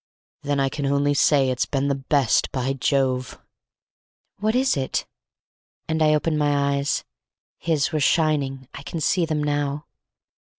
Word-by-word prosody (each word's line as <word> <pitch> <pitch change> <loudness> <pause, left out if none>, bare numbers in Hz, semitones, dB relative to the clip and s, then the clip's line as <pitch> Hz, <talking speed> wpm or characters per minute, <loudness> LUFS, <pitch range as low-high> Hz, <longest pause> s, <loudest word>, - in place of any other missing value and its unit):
Then 145 -1 -1
I 135 - +2
can 140 +1 -3
only 140 +1 +2
say 140 -2 +3
it's 125 - -1
been 140 0 -1
the 140 - +1
best—by 135 -1 +1
Jove!" 130 -2 -1 1.0
"What 215 +3 0
is 260 +1 +2
it?" 135 -2 -2 0.8
And 160 0 -1
I 155 -1 +4
opened 155 0 0
my 140 -1 +1
eyes. 140 0 -1 0.6
His 160 -3 0
were 155 - 0
shining. 140 -3 +1
I - - -8
can 165 +3 -6
see 170 +2 +1
them 155 -2 -1
now. 145 0 -2
145 Hz, 145 wpm, -23 LUFS, 135-155 Hz, 1.0 s, I